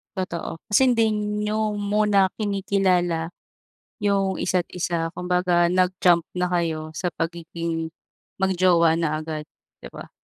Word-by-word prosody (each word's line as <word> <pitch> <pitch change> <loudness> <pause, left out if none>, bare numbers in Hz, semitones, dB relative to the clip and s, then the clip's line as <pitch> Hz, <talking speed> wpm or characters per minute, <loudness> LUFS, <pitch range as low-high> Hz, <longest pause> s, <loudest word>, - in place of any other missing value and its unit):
Totoo. 170 -3 -4
Kasi 260 +6 +4
hindi 225 -2 +2
niyo 210 0 -1
muna 205 -1 +2
kinikilala 185 -5 0 0.7
yung 200 -2 0
isa't 180 -1 0
isa. 170 -2 -2
Kumbaga 180 -1 +2
nag-jump 180 -1 +3 0.2
na 180 - +1
kayo 165 -3 -2
sa 180 +2 -2
pagiging 165 -1 -4 0.5
mag-jowa 180 -3 +3
na 160 -2 0
agad, 155 -1 -5 0.4
di - - -9
ba? - - -10
180 Hz, 115 wpm, -23 LUFS, 170-200 Hz, 0.7 s, Kasi